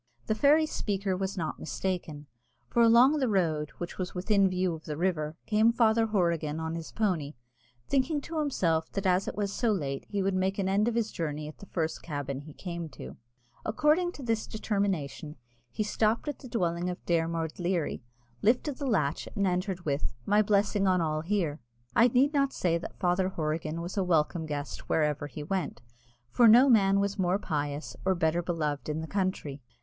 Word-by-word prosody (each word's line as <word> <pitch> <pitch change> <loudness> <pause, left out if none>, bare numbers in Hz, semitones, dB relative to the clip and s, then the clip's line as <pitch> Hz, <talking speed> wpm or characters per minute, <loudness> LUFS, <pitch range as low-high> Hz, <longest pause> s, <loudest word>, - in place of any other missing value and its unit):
The - - +1
fairy 290 +7 +4
speaker 200 -9 -2
was 190 +1 -3
not 160 -3 -3
mistaken; 160 -5 -4 0.4
for 235 - +2
along 240 +6 +6
the 260 - +1
road, 160 -7 +1
which 175 +2 -6
was 185 0 -4
within 195 +1 +3
view 185 -1 0
of 160 0 -9
the 150 -2 -4
river, 160 -3 -1
came 220 +1 +4
Father 225 -1 +3
Horrigan 170 -7 0
on 160 0 -3
his 165 -1 -6
pony, 170 -9 -1 0.5
thinking 280 +2 +1
to 320 +2 -4
himself 170 - 0
that 195 0 -3
as 185 +1 +2
it - - -4
was 200 -1 -2
so 235 -3 +1
late 140 -9 -3
he 200 -2 -1
would 195 0 +1
make 190 +1 0
an 195 -2 0
end 200 +3 +2
of 235 - 0
his 230 -2 0
journey 150 -2 -3
at 155 - -11
the 200 - -11
first 160 -3 -2
cabin 145 -4 -4
he 145 +1 -11
came 170 -3 -5
to. 65 - -10 0.5
According 305 +10 +2
to 280 - -9
this 225 -2 -1
determination, 190 -9 -2 0.3
he 215 - -2
stopped 215 +4 0
at 295 - -3
the 255 - -10
dwelling 175 -5 -1
of 180 - -7
Dermod 165 -1 -1
Leary, 175 -5 -1 0.4
lifted 255 +5 +2
the 280 - -3
latch, 155 - 0
and 200 -2 +1
entered 185 0 -1
with 140 -4 -1
"My 210 +1 +4
blessing 205 -1 +2
on 185 -1 +3
all 155 -2 0
here." 165 -4 -1 0.4
I 235 - +7
need 260 +5 +3
not 275 -2 +2
say 170 -2 +1
that - - -8
Father 185 +1 +1
Horrigan 155 -1 -3
was 175 +4 -6
a 195 - +2
welcome 165 -1 +1
guest 145 -1 -5
wherever 150 -2 +1
he 150 +1 -7
went, 190 +4 -2 0.5
for 235 - +6
no 250 +5 +7
man 200 -3 +5
was 200 0 -1
more 185 +1 +2
pious 145 -5 -3
or 190 0 +2
better 170 0 +1
beloved 155 -4 -2
in 155 +1 -2
the 160 - -5
country. 185 -8 -2
185 Hz, 195 wpm, -29 LUFS, 160-215 Hz, 0.5 s, I